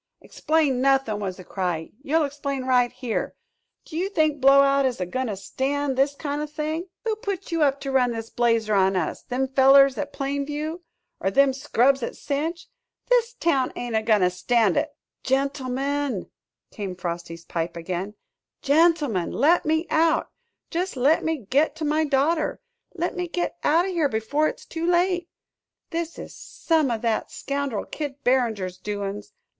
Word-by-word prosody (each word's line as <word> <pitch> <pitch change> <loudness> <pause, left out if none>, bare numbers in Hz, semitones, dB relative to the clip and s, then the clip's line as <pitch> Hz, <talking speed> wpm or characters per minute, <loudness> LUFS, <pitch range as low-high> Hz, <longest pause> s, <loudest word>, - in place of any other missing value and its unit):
"Explain 300 -5 0
nothin'!" 270 -6 +2
was 190 -3 -4
the 185 - -10
cry; 175 -3 -3
"you'll 310 +3 +1
explain 280 -1 -4
right 250 -1 +3
here! 245 -3 -3 0.5
Do 315 - -10
you 365 +4 -1
think 310 -7 +1
Blowout 275 +1 +6
is 255 -5 0
a 180 - -1
goin' 255 +8 -2
to 205 -3 -3
stand 270 +7 -2
this 275 +2 +2
kind 290 0 -3
o' 300 - -3
thing?" 310 +3 -3 0.2
"Who 445 -1 +1
put 395 -3 -5
you 330 -1 0
up 280 -2 +3
to 275 - -3
run 255 -2 +3
this 225 -1 -6
blazer 230 -3 +1
on 190 -1 +3
us? 180 -4 -2
Them 260 +1 -2
fellers 270 +1 +6
at 290 -1 -3
Plain 280 0 -2
View? 305 +4 -4 0.4
Er 190 - +2
them 275 +6 +4
scrubs 270 -1 +2
at 235 - -4
Cinche? 310 +4 -3 0.4
This 480 -1 +3
town 275 - +1
ain't 240 -2 -4
a 220 - +3
goin' 215 -2 +3
to 180 0 +3
stand 205 +2 +2
it!" - - +1 0.3
"Gentlemen," 275 -2 -1 0.4
came 195 -4 -5
Frosty's 170 -1 -6
pipe 165 0 -3
again, 185 +4 -4 0.5
"gentlemen, 290 - +3
let 315 +5 +3
me 315 +2 +2
out 320 0 +2 0.4
jest 355 -3 -2
let 280 +6 +3
me 320 0 0
git 285 +5 +2
to 315 -1 -4
my 305 +1 +2
daughter 300 +3 +1 0.4
let 345 0 -2
me 360 0 -2
git 350 +1 -2
out 330 +4 +3
o' - - -2
here 335 -6 +1
before 270 +7 0
it's - - -6
too 330 +1 -4
late! 355 0 +1 0.6
This 335 -1 -3
is - - -8
some 315 -5 0
o' 235 - 0
that 225 0 -1
scoundrel 280 -6 -3
Kid 285 -2 -6
Barringer's 220 -8 0
doin's. 205 0 -5
275 Hz, 170 wpm, -24 LUFS, 225-310 Hz, 0.6 s, Blowout